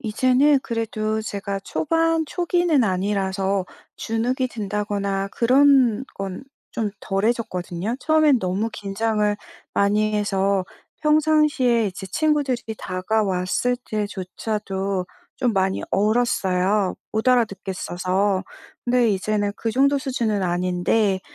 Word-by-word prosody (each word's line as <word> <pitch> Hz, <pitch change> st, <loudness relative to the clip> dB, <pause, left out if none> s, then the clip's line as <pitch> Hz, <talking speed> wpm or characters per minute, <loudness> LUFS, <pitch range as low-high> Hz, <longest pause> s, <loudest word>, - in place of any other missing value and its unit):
이제는 255 Hz, +5 st, +3 dB
그래도 220 Hz, -2 st, -2 dB
제가 200 Hz, -2 st, -4 dB
초반 325 Hz, +8 st, 0 dB
초기는 345 Hz, -4 st, +1 dB
아니라서 195 Hz, 0 st, 0 dB, 0.3 s
주눅이 245 Hz, +4 st, -1 dB
든다거나 200 Hz, -2 st, -2 dB
그런 260 Hz, -1 st, +4 dB
건 195 Hz, +3 st, -5 dB, 0.3 s
좀 220 Hz, -3 st, 0 dB
덜해졌거든요. 195 Hz, -2 st, -2 dB
처음엔 310 Hz, -4 st, +4 dB
너무 190 Hz, +5 st, -1 dB
긴장을 210 Hz, +1 st, -1 dB, 0.4 s
많이 210 Hz, +1 st, +2 dB
해서 195 Hz, -2 st, +1 dB, 0.4 s
평상시에 300 Hz, -7 st, +3 dB
이제 190 Hz, 0 st, -6 dB
친구들이 265 Hz, -, 0 dB
다가왔을 190 Hz, +4 st, 0 dB
때조차도 200 Hz, -1 st, -3 dB, 0.3 s
좀 245 Hz, -3 st, +1 dB
많이 190 Hz, -1 st, 0 dB
얼었어요. 200 Hz, -3 st, +1 dB, 0.2 s
못 220 Hz, +3 st, 0 dB
알아듣겠어서. 195 Hz, -4 st, 0 dB, 0.4 s
근데 245 Hz, -1 st, +3 dB
이제는 205 Hz, 0 st, 0 dB
그 225 Hz, -, -3 dB
정도 280 Hz, +4 st, +3 dB
수준은 235 Hz, -7 st, -1 dB
아닌데, 180 Hz, +3 st, +1 dB
215 Hz, 260 characters per minute, -22 LUFS, 195-245 Hz, 0.4 s, 그런